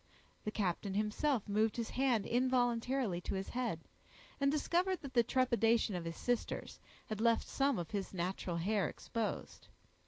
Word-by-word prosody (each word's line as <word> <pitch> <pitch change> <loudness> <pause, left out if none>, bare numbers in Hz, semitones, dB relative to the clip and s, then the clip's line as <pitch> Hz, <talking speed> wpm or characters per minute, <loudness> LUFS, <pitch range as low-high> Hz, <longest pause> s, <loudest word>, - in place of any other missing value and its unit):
The - - 0
captain 195 -1 -1
himself 215 +4 +1
moved 215 +2 +1
his 230 -2 -2
hand 250 -6 +2
involuntarily 245 -4 +1
to - - -3
his 195 0 -3
head, 240 -10 -2 0.6
and 275 0 +3
discovered 350 +5 +1
that 275 -2 -7
the 240 - +6
trepidation 235 -3 +2
of 175 -2 -3
his 165 0 -5
sisters 245 -2 -2 0.3
had 215 0 -4
left 230 0 +3
some 275 -3 +1
of 170 -2 -4
his 200 -2 -2
natural 180 -1 -2
hair 200 +3 +1
exposed. 230 -2 -4
225 Hz, 155 wpm, -35 LUFS, 195-255 Hz, 0.6 s, the